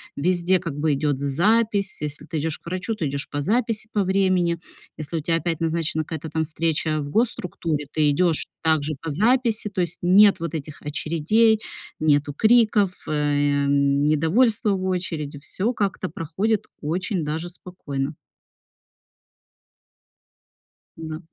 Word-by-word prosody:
везде 180 Hz, +3 st, +2 dB
как 165 Hz, -6 st, -5 dB
бы 150 Hz, 0 st, +1 dB
идёт 145 Hz, -1 st, 0 dB
з -, -, -4 dB
запись. 200 Hz, +7 st, +1 dB
Если 150 Hz, 0 st, -5 dB
ты 160 Hz, 0 st, -4 dB
идёшь 155 Hz, +1 st, -2 dB
к -, -, -34 dB
врачу, 185 Hz, +5 st, -2 dB
ты 170 Hz, -8 st, -2 dB
идёшь 140 Hz, 0 st, -4 dB
по 145 Hz, -, -3 dB
записи, 220 Hz, -, 0 dB
по 205 Hz, -3 st, +1 dB
времени. 185 Hz, -3 st, +2 dB, 0.4 s
Если 155 Hz, +1 st, -4 dB
у -, -, -2 dB
тя 165 Hz, +2 st, +1 dB
опять 165 Hz, -1 st, -1 dB
назначена 160 Hz, -1 st, -1 dB
какая-то 160 Hz, 0 st, -6 dB
там 160 Hz, +1 st, -1 dB
встреча 160 Hz, -1 st, -1 dB
в 145 Hz, -, -5 dB
госструктуре, 170 Hz, -7 st, -1 dB
ты 150 Hz, -1 st, +2 dB
идёшь 165 Hz, +1 st, +1 dB, 0.2 s
также 155 Hz, -1 st, +1 dB
по 165 Hz, -, -4 dB
записи, 225 Hz, -, +2 dB
то 190 Hz, -2 st, -2 dB
есть 175 Hz, 0 st, -2 dB
нет 195 Hz, +3 st, +6 dB
вот 165 Hz, -1 st, -4 dB
этих 150 Hz, -2 st, -6 dB
очередей, 170 Hz, +9 st, +2 dB, 0.4 s
нету 145 Hz, -1 st, +2 dB
криков, 215 Hz, 0 st, +4 dB, 0.2 s
эм, 145 Hz, -1 st, +1 dB, 0.6 s
недовольства 205 Hz, -, +3 dB
в 190 Hz, -1 st, -1 dB
очереди, 165 Hz, -6 st, -3 dB
всё 200 Hz, -, -2 dB
как-то 195 Hz, -4 st, -2 dB
проходит 185 Hz, +7 st, -1 dB, 0.2 s
очень 175 Hz, +4 st, -2 dB
даже 160 Hz, +3 st, -3 dB
спокойно. 150 Hz, -6 st, -5 dB, 2.8 s
Да. 160 Hz, -1 st, -6 dB
165 Hz, 145 wpm, -23 LUFS, 150-195 Hz, 2.8 s, нет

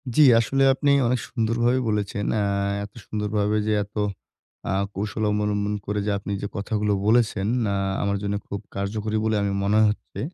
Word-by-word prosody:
জ্বী 155 Hz, -, +7 dB, 0.2 s
আসলে 135 Hz, +4 st, +1 dB
আপনি 140 Hz, +1 st, +1 dB, 0.2 s
অনেক 125 Hz, +1 st, +1 dB
সুন্দরভাবেই 120 Hz, +2 st, +1 dB
বলেছেন! 105 Hz, -1 st, -1 dB, 0.2 s
আ -, -, +1 dB, 0.4 s
এত 100 Hz, -, -9 dB
সুন্দরভাবে 105 Hz, 0 st, -1 dB
যে 110 Hz, -, +2 dB
এত 100 Hz, +1 st, -17 dB, 0.8 s
আ -, -, +1 dB, 0.2 s
কৌশল 105 Hz, +2 st, -3 dB
অবলম্বন 105 Hz, 0 st, 0 dB
করে 105 Hz, +1 st, -1 dB
যে 105 Hz, -, +1 dB
আপনি 100 Hz, +1 st, -6 dB
যে 100 Hz, -, -2 dB
কথাগুলো 105 Hz, +1 st, 0 dB
বলেছেন, 110 Hz, -3 st, +2 dB, 0.3 s
আ -, -, 0 dB, 0.3 s
আমার 100 Hz, 0 st, 0 dB
জন্য 100 Hz, 0 st, -1 dB
খুব 100 Hz, -, -4 dB, 0.2 s
কার্যকরী 105 Hz, +2 st, -2 dB
বলে 110 Hz, 0 st, +1 dB
আমি 100 Hz, -, 0 dB
মনে 105 Hz, +2 st, +3 dB
হচ্ছে। 105 Hz, -, -6 dB
105 Hz, 170 wpm, -24 LUFS, 100-110 Hz, 0.8 s, জ্বী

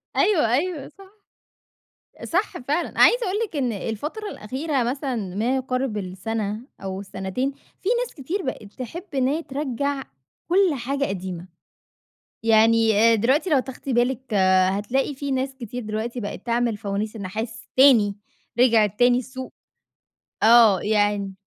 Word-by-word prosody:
أيوه، 305 Hz, -, +3 dB
أيوه، 305 Hz, +1 st, -1 dB
صح. 395 Hz, +2 st, -17 dB, 1.0 s
صح 370 Hz, +5 st, -1 dB
فعلًا، 295 Hz, +7 st, -2 dB
عايزة 485 Hz, -1 st, +6 dB
أقول 390 Hz, +2 st, -1 dB
لِك 360 Hz, -, -12 dB
إن 255 Hz, -4 st, 0 dB
الفترة 290 Hz, -, -4 dB
الأخيرة 265 Hz, -, -2 dB
مثلًا 265 Hz, +1 st, -2 dB, 0.2 s
ما 235 Hz, +6 st, +1 dB
يقارِب 255 Hz, -3 st, -2 dB
السنة 205 Hz, +3 st, -3 dB, 0.2 s
أو 190 Hz, 0 st, -4 dB
السنتين 195 Hz, +7 st, -3 dB, 0.3 s
في 390 Hz, -, -1 dB
ناس -, -, -9 dB
كتير 335 Hz, +7 st, -4 dB
بقِت 215 Hz, -6 st, -6 dB
تحب 260 Hz, +8 st, -7 dB
إن 255 Hz, -1 st, +2 dB
هي 310 Hz, +5 st, -1 dB
ترَجَّع 280 Hz, 0 st, -2 dB, 0.5 s
كل 370 Hz, -1 st, +4 dB
حاجة 275 Hz, +3 st, -2 dB
قديمة، 185 Hz, -4 st, -5 dB, 1.0 s
يعني 225 Hz, 0 st, +4 dB, 0.2 s
أ -, -, +5 dB
دلوقتي 265 Hz, -, +2 dB
لو 290 Hz, -4 st, +4 dB
تاخدي 265 Hz, +1 st, -5 dB
بالِك 245 Hz, 0 st, 0 dB, 0.4 s
هتلاقي 240 Hz, +9 st, -1 dB
في 280 Hz, 0 st, -4 dB
ناس 265 Hz, 0 st, -1 dB
كتير 245 Hz, -1 st, -6 dB
دلوقتي 220 Hz, +3 st, -3 dB
بقِت 205 Hz, +1 st, -6 dB
تعمِل 235 Hz, -2 st, 0 dB
فوانيس 205 Hz, +2 st, -3 dB
النحاس 220 Hz, +3 st, -5 dB
تاني، 235 Hz, -7 st, +6 dB, 0.4 s
رجعت 220 Hz, -5 st, +4 dB
تاني 245 Hz, 0 st, +5 dB
السوق. 260 Hz, +1 st, -8 dB, 0.9 s
آه، 225 Hz, -4 st, +7 dB
يعني 205 Hz, -2 st, +1 dB
245 Hz, 135 wpm, -23 LUFS, 215-280 Hz, 1.0 s, آه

